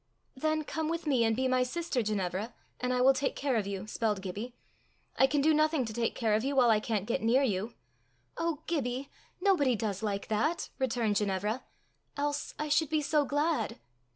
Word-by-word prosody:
"Then 310 +3 0
come 315 +1 -3
with 335 0 -3
me 265 -6 +3
and 225 -1 +2
be 260 +2 +1
my 255 0 +2
sister, 265 +1 -1
Ginevra, 210 +1 -2 0.2
and 250 0 -1
I 250 0 +1
will 265 +2 +6
take 275 +1 -1
care 275 -3 0
of 210 -3 0
you," 195 -1 -4
spelled 215 -2 -1
Gibbie. 210 +6 -5 0.6
"I 265 - +5
can 285 +1 +1
do 310 +2 +4
nothing 305 -3 +2
to 220 - -5
take 230 0 -1
care 225 -3 +1
of 215 +2 +2
you 275 +1 -1
while 245 -3 +5
I 215 - +4
can't 210 -3 -2
get 235 - -1
near 240 +5 +3
you." 215 -1 -1 0.6
"Oh, 330 -3 -2
Gibbie! 270 -4 -2 0.3
nobody 290 -11 +3
does 205 -2 -2
like 200 -2 -2
that," 295 +11 0
returned 230 -5 +1
Ginevra, 210 +4 -1 0.3
" - - -25
else 290 0 -2
I 300 - -2
should 300 0 +2
be 310 -1 +1
so 290 0 +2
glad!" 295 +3 0
250 Hz, 205 wpm, -30 LUFS, 215-290 Hz, 0.6 s, will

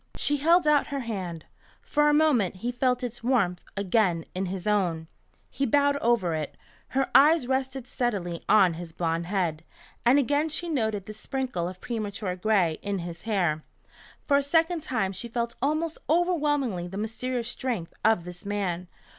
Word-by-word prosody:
She 290 - +1
held 330 +3 +4
out 295 -1 +4
her 280 -1 -3
hand. 185 -8 -5 0.4
For 295 0 +2
a - - +4
moment 280 - +3
he 245 - +1
felt 250 0 0
its 240 -1 -5
warmth 200 -9 +1 0.2
again 190 -4 +1
in 185 +1 -2
his 185 0 -5
own. 180 -6 +1 0.5
He 275 - -3
bowed 285 +3 +3
over 230 -10 +1
it. 155 -2 -4 0.3
Her 270 0 -1
eyes 295 +1 +6
rested 265 0 -1
steadily 190 -9 -2
on 190 -5 +6
his 165 0 -8
blond 165 0 -1
head, 175 -5 -1 0.4
and 245 +3 +5
again 290 +3 +2
she 335 +3 -3
noted 220 - -1
the 215 - -7
sprinkle 230 -7 -3
of 185 0 -11
premature 210 -5 -3
gray 185 -4 +1
in 200 -1 -2
his 170 -1 -7
hair. 175 -7 +1 0.6
For 280 - +5
a - - +3
second 325 +4 +2
time 220 -9 -1
she 195 +5 -6
felt 235 0 -2
almost 310 +4 0
overwhelmingly 295 - +1
the 190 +2 -7
mysterious 235 +3 -3
strength 235 -10 -3
of 220 -5 +3
this 180 +1 -9
man. 190 -4 -2
225 Hz, 170 wpm, -27 LUFS, 180-275 Hz, 0.6 s, eyes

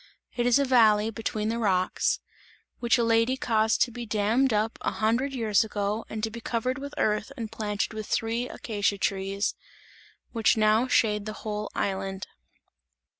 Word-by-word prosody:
It 240 -1 +1
is 245 - +5
a 280 - +2
valley 220 -4 +4
between 220 -1 -3
the 230 +1 -1
rocks, 185 -4 +1 0.6
which 235 -1 +3
a 235 - +2
lady 230 +3 +2
caused 220 -3 +2
to 245 - -4
be 240 +1 -6
dammed 220 +5 +2
up 215 +1 0
a - - 0
hundred 235 +6 +1
years 225 -5 +2
ago 210 0 -2
and 215 -1 -5
to 220 - -1
be 235 +1 -8
covered 250 +4 -2
with 280 +1 -7
earth 215 +4 0
and 225 -3 -5
planted 210 0 -2
with 215 -1 -6
three 230 +2 -1
acacia 205 -2 -1
trees, 195 +1 -1 0.8
which 225 -1 +2
now 215 +3 +3
shade 210 -4 +2
the 215 - -4
whole 210 -1 -3
island. 195 -1 -2
220 Hz, 170 wpm, -27 LUFS, 210-235 Hz, 0.8 s, is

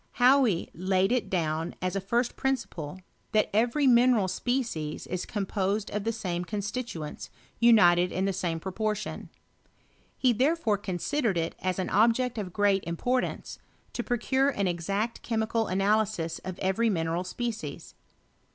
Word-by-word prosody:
Hauy 250 -7 +4
laid 185 +3 +1
it 250 -2 0
down 160 -2 -1
as 185 +1 -2
a 195 - -1
first 235 +5 0
principle, 190 - -3 0.3
that 215 -1 +2
every 240 +7 +2
mineral 240 -5 +5
species 190 - -2
is 180 0 -4
composed 200 0 -1
of 210 0 -3
the 230 - +1
same 180 -6 -3
constituents 205 -5 -5 0.3
onited 180 -7 +6
in 185 +2 -1
the 195 - 0
same 170 -3 -2
proportion. 210 +3 -3 0.9
He 255 -2 +3
therefore 255 -4 +1
con 190 -3 -3
sidered 235 - 0
it 165 0 -1
as 185 -1 -1
an 185 - -2
object 230 +3 +3
of 190 -3 -4
great 200 0 +2
importance, 245 +10 -2 0.3
to 240 - -3
pro 245 - 0
cure 265 +3 +2
an 200 -8 -1
exact 195 +6 -2
chemical 225 -1 -1
analysis 195 -4 0
of 185 -1 -7
every 195 +5 +1
mineral 165 -2 -1
species. 230 +4 -5
205 Hz, 145 wpm, -28 LUFS, 180-235 Hz, 0.9 s, onited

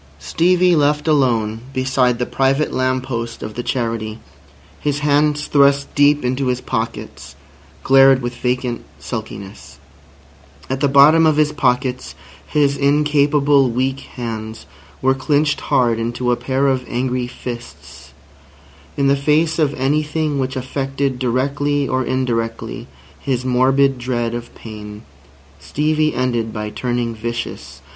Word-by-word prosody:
Stevie 180 - +2
left 150 0 +1
alone 115 -7 +1 0.2
beside 130 -2 +1
the 125 - -1
private 135 +4 0
lamp 130 0 0
post 115 -3 -5
of 110 - -6
the 120 - -4
Charity, 115 -3 -3 0.6
his 145 -1 -2
hands 150 0 +2
thrust 140 -1 +3
deep 145 -1 +3
into 130 +2 -1
his 125 0 0
pockets, 115 -2 -5 0.5
glared 135 0 +6
with 120 0 -4
vacant 125 0 -2
sulkiness. 95 +7 -8 0.9
At 130 - -1
the 145 - +2
bottom 150 +4 +6
of 155 -1 +2
his 150 -1 +3
pockets 130 -3 -1 0.3
his 140 -2 +1
incapable 145 -1 +3
weak 130 +3 -1
hands 110 -3 -7 0.4
were 130 0 +4
clinched 150 +2 0
hard 120 -3 +1
into 120 +2 -1
a - - +3
pair 135 +2 -1
of 130 -2 +1
angry 125 0 -2
fists. 120 -1 -9 0.9
In 140 - +1
the 140 0 +4
face 155 +3 +1
of 150 -3 +2
anything 150 +2 0
which 130 0 -2
affected 135 0 -2
directly 140 +3 0
or 130 +1 0
indirectly 120 -3 -3 0.3
his 125 - -2
morbid 130 +1 +2
dread 120 -2 -2
of 120 0 -7
pain, 105 -1 -10 0.6
Stevie 155 +1 0
ended 120 -3 -1
by 105 -1 -5
turning 120 -1 -2
vicious. 115 +1 -6
130 Hz, 130 wpm, -19 LUFS, 120-145 Hz, 0.9 s, glared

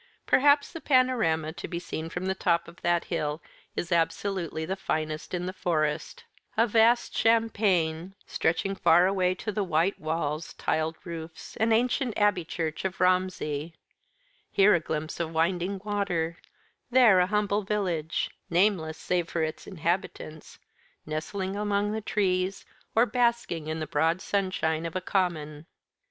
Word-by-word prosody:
Perhaps 285 +1 +4
the 330 - -7
panorama 225 - +2
to 175 - -7
be 170 - -4
seen 165 -2 -5
from 175 +2 -4
the 190 - +1
top 170 -3 +1
of 170 +1 -14
that 175 0 +2
hill 150 -3 -2 0.4
is 175 - -3
absolutely 170 -1 0
the 190 +3 -2
finest 155 -4 -3
in 180 -1 -2
the 185 - -4
Forest 155 -4 -1 0.3
a 225 - +5
vast 230 +2 +3
champaign, 195 -6 +1
stretching 175 +4 0
far 175 -1 +5
away 185 -1 +1
to 215 +3 -4
the 210 0 -1
white 175 +2 +1
walls, 155 0 -2
tiled 160 0 -1
roofs, 165 -2 -8
and 225 +1 +2
ancient 245 +1 +1
abbey 205 -4 +3
church 160 -1 -4
of 190 -1 -3
Romsey; 180 -4 0 0.7
here 200 +2 +5
a 175 - +4
glimpse 155 0 -4
of 165 -1 -2
winding 180 +4 0
water, 185 -6 -1 0.5
there 240 -7 +6
a 180 - +3
humble 210 0 +1
village 185 -6 -1 0.2
nameless 170 -3 +2
save 175 -2 -1
for 165 - -1
its 155 0 -4
inhabitants 170 -3 -3 0.5
nestling 185 +5 -3
among 205 0 0
the 220 +1 -2
trees, 190 -2 0 0.3
or 225 +2 +6
basking 235 -10 0
in 160 +1 -3
the 155 - -2
broad 160 +3 +1
sunshine 175 -5 -1
of 165 - -9
a - - +1
common. 165 -5 -2
180 Hz, 150 wpm, -27 LUFS, 160-200 Hz, 0.7 s, there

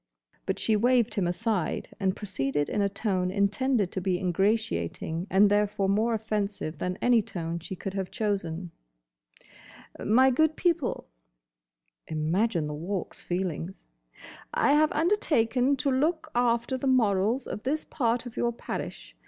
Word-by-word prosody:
But - - 0
she 220 - +1
waved 240 +1 +3
him 195 -5 0
aside 190 -1 -1
and 190 -2 +1
proceeded 145 -7 -2
in 210 - 0
a 200 - +2
tone 190 -3 -1
intended 200 +2 +1
to 190 - -3
be 180 0 0
ingratiating, 180 - -1
and 195 +2 +5
therefore 205 -1 +1
more 220 +4 +2
offensive 210 -6 -3
than 180 0 -2
any 245 -2 +5
tone 170 -4 -4
she 180 +3 -7
could 190 +1 -5
have 195 -2 -3
chosen, 185 -6 -2 1.3
"My 260 +5 +5
good 315 +4 +2
people"—imagine - - -3
the 150 - -4
Walk's 175 +5 -4
feelings!—"I 165 - -3
have 305 +1 +4
undertaken 280 - +2
to 275 +1 0
look 310 +5 0
after 240 +2 +1
the 270 - -2
morals 225 -1 +2
of - - -5
this 295 +6 -1
part 235 -3 0
of 245 - -8
your 240 - +1
parish. 235 - -6
205 Hz, 135 wpm, -28 LUFS, 175-240 Hz, 1.3 s, and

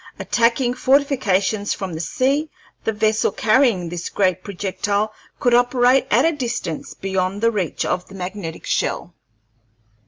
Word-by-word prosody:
Attacking 240 +1 +1
fortifications 245 -7 +1
from 190 -3 -5
the 160 - -5
sea, 275 - 0 0.4
the - - +2
vessel 215 0 +1
carrying 225 -6 +2
this 175 +1 -5
great 185 -2 0
projectile 200 +2 -2 0.3
could 245 - +2
operate 245 +2 +4
at 240 +7 +4
a 330 - +4
distance 245 - -4
beyond 190 0 -2
the 230 +1 +3
reach 190 -7 -2
of 180 - -2
the 195 - -12
magnetic 180 -2 -6
shell. - - -1
215 Hz, 135 wpm, -21 LUFS, 190-245 Hz, 0.4 s, operate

